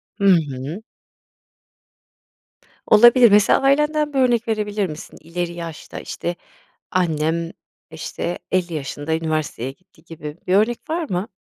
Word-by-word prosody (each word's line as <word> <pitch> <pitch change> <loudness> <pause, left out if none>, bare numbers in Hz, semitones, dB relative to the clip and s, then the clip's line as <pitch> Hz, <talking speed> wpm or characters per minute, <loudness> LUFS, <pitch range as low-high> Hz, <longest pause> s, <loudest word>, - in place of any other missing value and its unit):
Hı 200 -1 -2 0.2
hı. 140 +9 -6 2.0
Olabilir. 240 +1 +7
Mesela 205 0 +5
ailenden 300 +2 +2
bir 270 - +1
örnek 240 -2 +2
verebilir 210 -2 -1
misin? 155 -2 -9
"İleri 170 +1 -4
yaşta, 165 -2 -7
işte, 175 - -4 0.6
annem, 165 -1 0 0.4
işte, 175 - -5
50 180 -2 0
yaşında 145 +1 -3
üniversiteye 155 -6 -2
gitti." 185 +7 -27
gibi 155 -2 -8
bir 180 - +2
örnek 220 +4 +3
var 325 -1 -2
mı? 185 +4 -2
180 Hz, 120 wpm, -21 LUFS, 160-225 Hz, 2.0 s, Olabilir